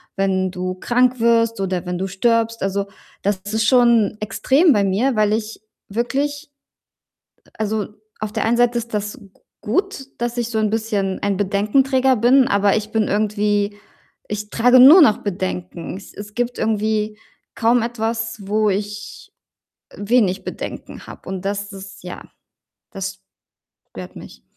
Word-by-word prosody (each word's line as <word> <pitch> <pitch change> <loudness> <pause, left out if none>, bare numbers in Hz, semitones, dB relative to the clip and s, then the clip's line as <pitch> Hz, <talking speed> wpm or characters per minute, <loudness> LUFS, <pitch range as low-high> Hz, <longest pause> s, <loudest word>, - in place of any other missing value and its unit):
Wenn 190 -1 0
du 185 0 -4
krank 250 +5 +1
wirst 230 -1 +2
oder 190 -2 -2
wenn 180 0 -3
du 190 +2 -2
stirbst?“ 230 +3 0
Also, 195 +1 -1 0.4
das 200 0 +1 0.2
ist 220 0 +1
schon 235 -4 +4
extrem 285 - +3
bei 205 -3 +2
mir, 235 +7 +1
weil 210 0 +3
ich 220 0 -3 0.3
wirklich 275 +7 -2 1.0
äh, - - -25
also, 215 -1 -1 0.3
auf 215 -1 -4
der 220 - -1
einen 235 +1 +2
Seite 240 0 +3
ist 235 -1 -6
das 210 0 -3
g 200 - -16 0.3
gut, 280 - -1
dass 240 0 -2
ich 235 - -1
so 225 - -1
'n 215 -1 +1
bisschen 210 -4 -1
ein 200 -1 0
Bedenkenträger 255 +7 +2
bin, 245 +3 +4
aber 200 0 +3
ich 215 0 -4
bin 220 -2 +1
irgendwie 205 0 0 0.5
ich 210 0 -4
trage 245 +2 +5
nur 310 +8 +10
noch 215 -8 +5
Bedenken. 180 -3 -4
Es 195 - -14
es 210 +1 -9
gibt 245 +1 -2
irgendwie 215 0 -1 0.4
kaum 230 +1 +2
etwas, 225 -1 -3
wo 210 +1 +2
ich, 205 +1 -5 0.6
äh, - - -17
wenig 205 -3 +1
Bedenken - - -7
habe, - - -12
und 190 -1 -5
das 205 +1 -3
ist 195 -1 -11
ja, 180 - -8 0.7
das 195 -1 -5 0.7
stört - - -10
mich. - - -12
215 Hz, 155 wpm, -20 LUFS, 200-235 Hz, 1.0 s, nur